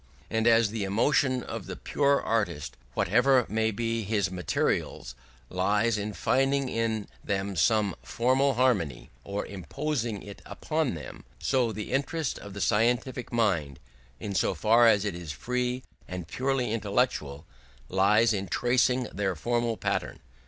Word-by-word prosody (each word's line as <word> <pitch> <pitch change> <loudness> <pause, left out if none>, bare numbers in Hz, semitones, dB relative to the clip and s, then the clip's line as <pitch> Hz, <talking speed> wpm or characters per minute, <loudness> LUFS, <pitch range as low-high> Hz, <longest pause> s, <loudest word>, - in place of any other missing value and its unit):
And 115 +1 +1
as 115 -2 +5
the 110 -2 -2
emotion 125 +5 +2
of 110 -5 -6
the - - -5
pure 140 -1 +1
artist, 100 -10 -1 0.2
whatever 130 -3 +3
may 110 0 +1
be 115 +1 -1
his 100 -2 0
materials, 90 -8 -1 0.3
lies 105 - +1
in 105 0 -3
finding 135 +4 +1
in 110 -3 -1 0.2
them 100 -1 -2
some 100 +4 +2
formal 130 - +1
harmony 100 - +1
or 100 +1 -3
imposing 115 - -3
it 100 0 -10
upon 155 - -2
them, 75 -5 -9
so 125 -4 +1
the 105 -1 -6
interest 145 +2 -1
of 100 -1 -10
the 100 - -5
scientific 120 +3 +1
mind, 85 - 0 0.4
in 100 - -4
so - - +1
far 115 +2 +5
as 105 -2 +4
it 100 - -1
is 85 -3 -6
free 125 +6 -2 0.2
and 90 -2 -6
purely 130 +3 -1
intellectual, 100 - -1 0.4
lies 105 +4 +4
in 100 -1 -2
tracing 125 +5 +2
their 95 -2 -1
formal 120 +5 -1
pattern. - - -2
110 Hz, 145 wpm, -28 LUFS, 100-125 Hz, 0.4 s, as